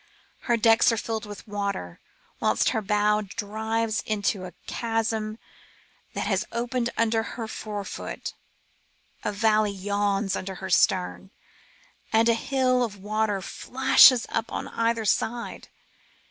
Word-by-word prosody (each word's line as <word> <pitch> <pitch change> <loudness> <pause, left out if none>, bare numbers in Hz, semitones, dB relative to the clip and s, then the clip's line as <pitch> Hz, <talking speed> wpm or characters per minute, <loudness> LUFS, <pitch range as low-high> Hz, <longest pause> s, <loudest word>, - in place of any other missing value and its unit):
Her 235 - +4
decks 225 +1 +5
are 230 - 0
filled 220 -1 -3
with 205 +2 -10
water. 200 - -4 0.4
Whilst - - +2
her 220 - -1
bows 210 +1 +2
dive 220 +1 -1
into 205 -3 -1
a 180 - -9
chasm 225 -2 -2 0.8
that - - -2
has - - +1
opened 240 0 -1
under 225 0 +2 0.2
her 225 -2 -4
fore 210 -2 -5
foot, - - -6 0.9
a - - -1
valley 215 0 +2
yawns 200 0 -1
under 190 0 -5
her 190 +1 -6
stern, 185 +2 +2 0.8
and 225 +1 +4
a 230 - +5
hill 255 +1 +1
of 210 -4 -4
water 210 0 -1
flashes 260 +2 +5
up 225 0 -2
on - - -4
either 230 -1 0
side. 235 +3 -1
220 Hz, 130 wpm, -26 LUFS, 205-230 Hz, 0.9 s, decks